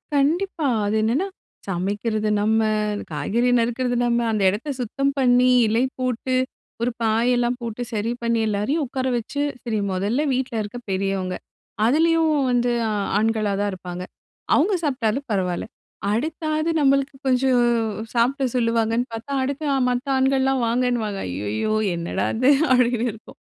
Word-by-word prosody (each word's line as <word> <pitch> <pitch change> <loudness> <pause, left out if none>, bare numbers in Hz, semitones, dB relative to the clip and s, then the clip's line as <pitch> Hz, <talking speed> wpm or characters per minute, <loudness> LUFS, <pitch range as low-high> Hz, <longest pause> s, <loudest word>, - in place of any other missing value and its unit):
கண்டிப்பா. 315 +3 +1 0.2
அது 205 +1 0
என்னன்னா 250 - +1 0.4
சமைக்கிறது 205 +4 -1
நம்ம, 220 +1 +2 0.5
காய்கறி 205 +12 0
நறுக்குறது 245 +2 0
நம்ம, 240 0 +2
அந்த 215 -2 0
எடத்த 210 +10 -4
சுத்தம் 275 +4 0
பண்ணி, 250 -1 +4 0.2
இலை 225 +3 +2 0.2
போட்டு, 255 0 -1 0.5
ஒரு 240 +1 +1
பாயெல்லாம் 240 +2 +2
போட்டு, 235 0 -5
சரி 220 +2 -1
பண்ணி, 235 -1 +1
எல்லாரையும் 215 +10 0
உட்கார 260 0 -3
வச்சு, 240 +5 -4 0.2
சரி 225 -3 -1
மொதல்ல 205 +10 0
வீட்ல 255 -1 -2
இருக்க 210 +4 -7
பெரியவங்க. 190 -1 -1 0.5
அதுலயும் 325 +5 +3 0.2
வந்து 245 0 +2 0.5
ஆண்களா 215 -1 +1
தான் 205 0 0
இருப்பாங்க. 180 -1 -6 0.5
அவங்க 360 +8 +3
சாப்ட்டாலும் 260 -2 -1
பரவாயில்ல. 185 -2 -1 0.4
அடுத்தாவது 310 +6 -1
நம்மளுக்கு 275 0 +2
கொஞ்சம் 255 -1 +3 0.5
சாப்ட 255 +4 +1
சொல்லுவாங்கன்னு 230 0 +1
பார்த்தா, 225 +5 -6
அடுத்து 280 +3 -3 0.2
மத்த 250 +2 -2
ஆண்கள்லாம் 265 -1 +2
வாங்கனுவாங்க. 235 -4 0
ஐயையோ! 105 - -2 0.2
என்னடா 170 0 -2
இது? 255 +4 +5 0.2
அப்டின்னு 245 -1 +3
இருக்கும். 225 - -14
240 Hz, 130 wpm, -23 LUFS, 215-265 Hz, 0.5 s, இது